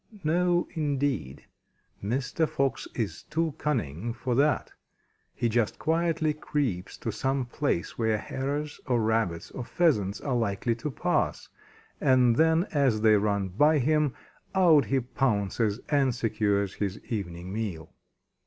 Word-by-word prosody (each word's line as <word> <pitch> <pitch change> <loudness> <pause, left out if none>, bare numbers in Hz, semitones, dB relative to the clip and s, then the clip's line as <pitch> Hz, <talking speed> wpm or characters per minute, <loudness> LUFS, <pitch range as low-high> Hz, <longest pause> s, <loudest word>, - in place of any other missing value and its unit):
No, 175 +2 +2
indeed! 140 - -2 0.6
Mr. 130 +8 0
Fox 135 -1 -1
is 105 -9 -3
too 165 -1 -1
cunning 115 - -2
for 125 +1 -2
that. 145 +4 +2 0.6
He 120 - 0
just 115 -1 0
quietly 165 -1 +1
creeps 135 -11 -2
to - - -3
some 135 -1 -1
place 120 - -2
where 110 -1 +2
Hares 145 +6 -4
or 125 -2 +2
Rabbits 110 -7 0
or 125 - -5
Pheasants 115 - +1
are 135 -3 -2
likely 115 0 0
to 120 +6 -4
pass, 130 - -1 0.5
and 125 -3 +4
then 160 +4 +4
as 135 -8 +2
they 110 -1 +6
run 100 -2 +1
by 150 - +4
him, 150 0 +2 0.4
out 165 -6 +6
he 135 -1 +1
pounces 110 -3 0
and 135 -5 +2
secures 105 -4 0
his 100 -1 -3
evening 90 -4 -5
meal. 100 -8 -4
125 Hz, 135 wpm, -28 LUFS, 105-150 Hz, 0.6 s, they